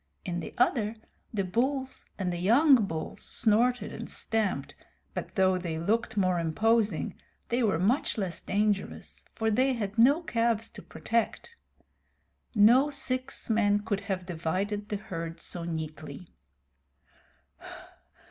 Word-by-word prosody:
In 175 -1 -2
the 165 - -7
other, 230 -3 +2 0.4
the 205 -3 -1
bulls 260 +7 -1
and 185 -3 -1
the 175 - -4
young 240 - +5
bulls 160 -2 -5
snorted 235 0 +1
and - - -6
stamped, 210 -11 -1 0.4
but - - -6
though 185 -1 +3
they 170 -3 -3
looked 215 +7 0
more 185 -3 +2
imposing 215 +7 +1 0.4
they 240 +2 +1
were 210 -8 +2
much 220 - +1
less 190 -5 -3
dangerous, 205 0 -1
for 220 0 0
they 260 +5 +3
had 210 -2 -3
no 280 +8 +5
calves 230 -5 0
to - - -10
protect. 230 - -2 1.0
No 240 +7 +6
six 260 -2 -3
men 205 -2 +3
could 205 -2 -1
have 185 -2 -2
divided 190 +5 -2
the 210 - -1
herd 165 -4 -6
so 170 0 -4
neatly. 160 +1 -6
210 Hz, 130 wpm, -29 LUFS, 180-235 Hz, 1.0 s, No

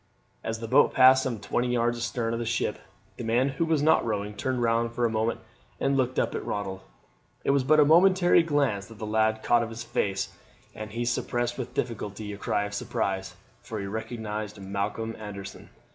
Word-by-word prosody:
As 110 0 -3
the 115 - -4
boat 135 +5 +4
passed 130 0 +7
some 125 -5 -2
twenty 120 +4 -1
yards 120 -1 +1
astern 120 -1 -2
of 115 - -2
the - - -1
ship 115 - -1 0.4
the - - -5
man 120 +4 +2
who 140 +5 -1
was 160 -3 +1
not 160 +1 +4
rowing 105 -2 -2
turned 130 +4 -2
round 115 0 +1
for 120 0 0
a 115 - +1
moment 110 +1 -1 0.4
and 135 - +1
looked 130 -1 0
up - - +1
at - - -3
Ronald. 95 -2 -4 0.6
It - - +2
was 140 -1 +3
but 155 +4 +4
a 150 - +7
momentary 175 +3 +5
glance 140 -11 0
that 115 - -13
the 110 - -5
lad 110 0 +1
caught 120 -1 +4
of 115 - -3
his 115 +1 -6
face, 95 -3 -1 0.4
and 110 0 -7
he 115 +3 -3
suppressed 120 0 -1
with 125 - -5
difficulty 105 -2 -3
a - - -7
cry 105 - 0
of 105 0 -5
surprise, 95 -2 -2 0.3
for 115 -3 -6
he 100 - -4
recognized 110 0 -5
Malcolm 100 +3 -3
Anderson. 100 -2 -8
115 Hz, 205 wpm, -27 LUFS, 105-130 Hz, 0.6 s, passed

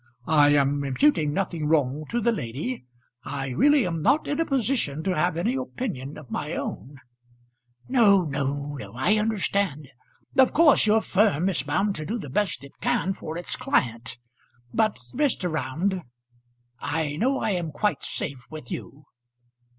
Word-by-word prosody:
I 150 -2 +5
am 140 0 +2
imputing 150 - +2
nothing 170 -3 -2
wrong 150 -1 +1
to 240 - 0
the 235 +1 +2
lady. 155 - -4 0.4
I 135 -1 -4
really 285 - +4
am 165 -3 -2
not 295 - +2
in 290 - -1
a 330 - +2
position 240 - 0
to 185 0 0
have 170 +1 +1
any 220 +9 0
opinion 230 - -4
of 150 -6 -12
my - - -3
own 140 +3 -5 0.5
" 120 0 -44
"No, 210 -7 +5
no, 140 -1 -2
no; 100 -2 -9
I 135 - +2
understand. 200 - -1 0.5
Of 260 - +6
course 305 -8 +5
your 215 +1 +4
firm 190 -4 +2
is 185 - -1
bound 195 +8 0
to 155 - -5
do 230 - -2
the 145 - -7
best 170 -6 -1
it 140 - -15
can 240 -6 +1
for 160 -3 -6
its 175 - -2
client. 120 0 -1 0.6
But, 220 -1 +2 0.2
Mr. 250 - 0
Round; 170 +5 -1 0.8
I 155 -1 -2
know 265 - +1
I 220 - 0
am 175 -4 -2
quite 205 +7 0
safe 135 -3 -4
with 155 -6 -9
you." 145 +1 -7
165 Hz, 165 wpm, -25 LUFS, 140-215 Hz, 0.8 s, Of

